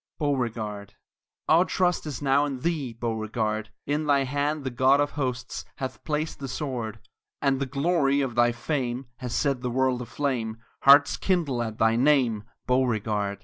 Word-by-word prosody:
BEAUREGARD 110 - -2 0.5
Our 165 +3 +6
trust 180 -3 0
is 145 -2 -5
now 140 +1 +3
in 135 -3 -4
thee, 155 -6 -1
Beauregard! 110 -1 -2 0.2
In 150 +1 -1
thy 140 -1 +4
hand 145 +3 -1
the 130 - -3
God 130 +3 +4
of 145 0 +1
Hosts 130 -3 -3
Hath 130 -1 -6
placed 155 0 -2
the 135 - -5
sword; 125 -5 -4 0.4
And 135 -2 +1
the 140 - -1
glory 140 0 +2
of 135 -3 -2
thy 120 0 +4
fame 125 0 -2
Has 125 -2 -4
set 140 -4 +1
the 125 - -2
world 130 0 +1
aflame 120 -3 -2 0.2
Hearts 140 +1 +6
kindle 160 -10 0
at 110 -2 -4
thy 115 0 +3
name, 125 -6 +3 0.2
Beauregard! 110 -5 0
130 Hz, 160 wpm, -26 LUFS, 120-145 Hz, 0.5 s, Our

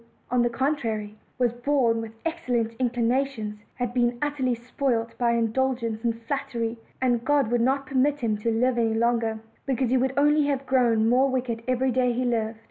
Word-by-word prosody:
on 250 -1 +3
the 240 - +2
contrary, 230 -5 -2 0.2
was 245 -2 +1
born 240 -2 +1
with 225 -1 -7
excellent 245 -9 -1
inclinations, 240 -3 0 0.2
has 245 -2 -2
been 240 -1 +1
utterly 275 -4 0
spoiled 235 -1 -2
by 235 -1 +2
indulgence 230 -1 0
and 230 -1 -1
flattery; 240 -4 -2 0.2
and 245 -2 +1
God 280 -4 +2
would 240 -1 +2
not 270 +3 +1
permit 275 +2 +1
him 225 -3 +1
to 230 - -1
live 240 +2 +1
longer, 225 0 +1 0.3
because 260 -2 0
he 260 - +4
would 260 +1 +1
only 295 +1 +4
have 275 -1 -1
grown 235 -4 +3
more 255 +3 +4
wicked 245 -3 -2
every 255 +1 +1
day 250 0 +2
he 250 +2 -1
lived. 225 -2 -1
245 Hz, 175 wpm, -25 LUFS, 230-265 Hz, 0.3 s, he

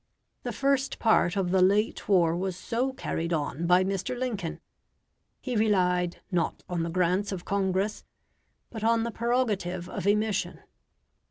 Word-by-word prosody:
The - - -4
first 275 0 0
part 210 -4 +3
of 185 -2 0
the 190 0 +3
late 205 +5 +2
war 170 -4 +4
was 185 +1 -2
so 245 +7 -1
carried 170 -9 -3
on 160 +1 -1
by 180 +1 +5
Mr. 195 +5 -2
Lincoln; 220 -9 -3 0.8
he 255 -2 -4
relied 180 -5 +1
not 170 -3 -1
on 175 -2 -2
the 165 - -2
grants 185 +3 +1
of 185 -3 -5
Congress, 195 +1 0 0.7
but 220 -2 -6
on 230 0 +3
the 235 - -2
prerogative 215 -8 -1
of 185 - -4
emission. 210 0 0
195 Hz, 150 wpm, -28 LUFS, 180-220 Hz, 0.8 s, by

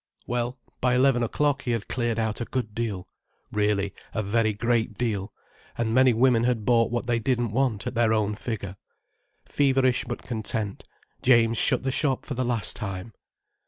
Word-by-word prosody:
Well, 120 +1 -2 0.2
by 125 0 +2
eleven 130 -1 +4
o'clock 145 +4 +1
he - - -5
had 115 -3 -1
cleared 120 -2 -1
out 110 0 -1
a - - -1
good 120 -5 -3
deal—really, 105 -1 -3 0.2
a 110 - 0
very 110 +2 +1
great 115 0 0
deal—and 110 +1 -4
many 130 +1 +5
women 120 0 +3
had 120 -3 0
bought 115 -1 +3
what 120 +1 -2
they 120 -1 +1
didn't 120 -2 0
want, 120 -4 0
at - - -3
their 115 -2 +2
own 105 -1 +1
figure. 100 -3 -5 0.7
Feverish 135 -3 +2
but 120 0 -5
content, 110 -3 -3 0.4
James 115 -3 +4
shut - - +4
the 135 - 0
shop 135 -1 0
for 140 - -4
the 130 0 -1
last 120 -3 -1
time. 100 0 -6
115 Hz, 165 wpm, -26 LUFS, 110-125 Hz, 0.7 s, many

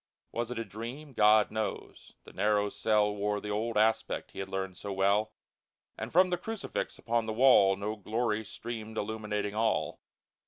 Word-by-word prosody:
Was 120 0 -2
it 125 - -5
a 115 - -2
dream? 120 +8 -8
GOD 105 -1 +5
knows! 110 -2 -5
The - - -14
narrow 105 +1 +2
cell 105 -1 +2
Wore 105 0 -1
the 105 - -5
old 110 +2 -1
aspect 110 +1 +1
he - - -9
had 95 0 -4
learned 95 -1 -3
so 100 +2 -6
well, 100 +3 +2 0.6
And - - -6
from 185 +2 +5
the 175 - 0
crucifix 220 -2 -4
upon 115 -1 -1
the 110 - -2
wall 110 -5 +6
No 105 +2 -3
glory 110 +1 -1
streamed 110 0 -7
illuminating 105 -1 -2
all 110 +1 0
110 Hz, 170 wpm, -30 LUFS, 105-115 Hz, 0.6 s, wall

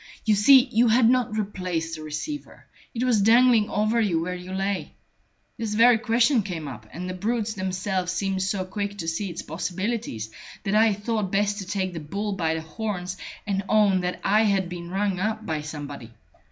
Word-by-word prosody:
You 215 - +4
see, 255 +6 +7
you 245 -2 +2
had 230 +1 +5
not 245 -3 +2
replaced 180 -5 -2
the 155 - -9
receiver; 155 - -6 0.3
it 240 -1 -3
was 240 -5 +3
dangling 230 0 +5
over 215 +3 +1
you 185 -7 +1
where 175 +2 -2
you 180 +1 -8
lay. 195 +1 -2 0.7
This 220 -2 -2
very 230 +1 +6
question 235 +2 +3
came 175 -6 -5
up, 120 -5 -9
and 180 +2 -6
the 185 - -3
brutes 215 +3 -1
themselves 185 -1 -2
seemed 190 +1 -1
so 190 0 -1
quick 205 +1 -4
to 165 - -5
see 175 +5 -2
its 170 - -6
possibilities 180 - -3 0.3
that 195 - -1
I 220 0 +5
thought 210 -2 -2
best 205 +1 +1
to 195 - -6
take 190 -2 -2
the 165 - -4
bull 200 +7 -3
by 165 -4 0
the 160 - -3
horns 180 +2 -4 0.3
and 195 -2 0
own 205 -3 +4
that 180 0 -3
I 210 +2 +4
had 195 -3 +1
been 175 -1 -7
rung 195 0 -1
up 215 +2 -2
by 155 -2 -2
somebody. 145 -5 -7
195 Hz, 195 wpm, -25 LUFS, 180-220 Hz, 0.7 s, see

